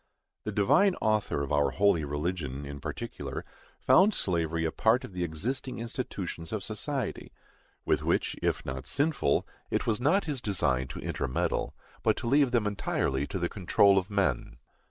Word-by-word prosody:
The - - -2
Divine 180 - +4
Author 105 -9 0
of 70 - -5
our 75 -1 +3
holy 100 -5 +3
religion, 75 -1 -3
in 70 0 -7
particular, - - -5 0.3
found 200 +3 +5
slavery 85 -2 0
a 80 - 0
part 115 +4 +3
of 115 - -9
the 90 -1 -2
existing 115 - -3
institutions 105 -8 -5
of 110 -3 -3
society; 125 - -4 0.5
with - - +2
which, - - 0
if - - 0
not 65 0 -5
sinful, 140 - +1 0.2
it - - 0
was 115 +1 0
not 165 +10 +3
his 145 -6 -2
design 65 - +1
to - - -7
intermeddle, 65 - -1 0.3
but - - +2
to - - -5
leave 140 +1 +4
them 120 -3 +1
entirely 70 -9 -1
to - - -4
the 85 -1 0
control 100 +1 +4
of 95 - -7
men. 95 -12 0
100 Hz, 165 wpm, -29 LUFS, 75-120 Hz, 0.5 s, found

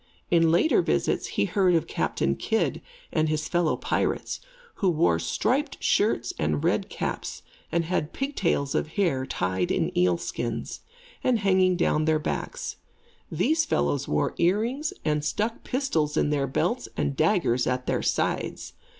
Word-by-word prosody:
In 165 -1 +5
later 175 - +4
visits - - 0
he - - +3
heard 185 -4 +3
of 165 - +2
Captain 70 0 -1
Kidd 225 - 0 0.3
and 155 -1 +2
his 155 0 -1
fellow 175 -2 +1
pirates, - - -1 0.4
who 195 - +2
wore 155 - +2
striped 250 - 0
shirts 160 - +1
and 75 -1 0
red - - +1
caps, - - -4 0.3
and 170 0 +1
had 165 -3 -1
pigtails 190 - -1
of - - 0
hair, 150 -10 +1
tied 90 -4 -1
in - - 0
eel 90 -1 +3
skins, 115 +7 -4 0.4
and 250 -2 +3
hanging 190 -3 +3
down 155 -3 +2
their 160 0 +3
backs. 155 - -4 0.5
These 320 +1 +2
fellows 145 - 0
wore - - 0
earrings 230 - +1
and 150 -1 +1
stuck 220 +9 -2
pistols 205 - 0
in 150 - +2
their 140 -2 +1
belts 235 - -1
and 140 - 0
daggers 155 - +2
at 125 0 -1
their - - 0
sides. - - -1
160 Hz, 150 wpm, -26 LUFS, 135-205 Hz, 0.5 s, In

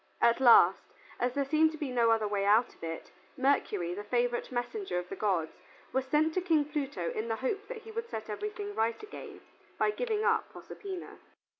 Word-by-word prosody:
At 235 +1 +4
last, 230 -8 +7 0.4
as 245 0 0
there 280 -1 +1
seemed 315 +3 +3
to - - -7
be 290 -4 -3
no 235 -2 +3
other 225 -2 +3
way 205 -1 -1
out 215 +4 +4
of - - -19
it, 165 0 -6 0.3
Mercury, 210 -10 +1
the 205 +3 -5
favorite 240 +4 0
messenger 255 - -3
of 180 0 -3
the - - -5
gods, 180 -7 0 0.4
was 265 0 0
sent 305 +3 +2
to 370 - 0
King 320 -5 +2
Pluto 280 - -3
in 220 +2 -3
the 225 - 0
hope 395 - -3
that 460 -1 -7
he 445 - -10
would 460 +1 -4
set 220 0 -5
everything 410 - -5
right 230 - -1
again 425 - -9 0.4
by 425 - +2
giving 435 -2 -1
up - - +1
Proserpina. 385 -3 -8
260 Hz, 200 wpm, -31 LUFS, 220-365 Hz, 0.4 s, last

